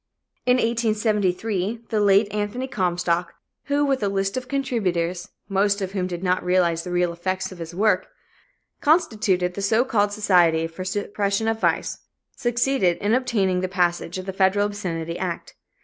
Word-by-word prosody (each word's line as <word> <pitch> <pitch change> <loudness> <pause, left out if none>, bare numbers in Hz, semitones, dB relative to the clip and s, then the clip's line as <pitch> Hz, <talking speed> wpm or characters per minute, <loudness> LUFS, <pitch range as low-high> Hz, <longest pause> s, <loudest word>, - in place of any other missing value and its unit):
In 250 - +5
1873, 215 -2 0
the 220 - 0
late 200 +1 +5
Anthony 210 +5 -2
Comstock, 175 -5 -1 0.3
who 290 0 +1
with 270 -2 0
a 205 - +1
list 195 0 -1
of 255 -1 -4
contributors, 185 -11 -1 0.2
most 200 +1 +1
of 190 -1 -3
whom 190 -2 -1
did 175 0 -5
not 180 0 +1
realize 175 -2 +2
the 180 - -6
real 175 -1 +1
effects 185 +3 -3
of 185 - -11
his 165 0 -7
work, 215 +3 +2 0.7
constituted 215 - +2
the 200 - -5
so 220 +5 +2
called 205 -5 +1
Society 175 -6 +3
for 165 +3 -8
the - - -4
Suppression 200 +2 -1
of 225 0 0
Vice, - - 0 0.4
succeeded 240 -6 +1
in 205 +2 0
obtaining 205 -8 +1
the 185 - -1
passage 175 -1 0
of 185 - -6
the 190 - -4
federal 195 +2 +3
obscenity 170 -5 -4
act. 180 -3 -4
195 Hz, 165 wpm, -23 LUFS, 180-220 Hz, 0.7 s, In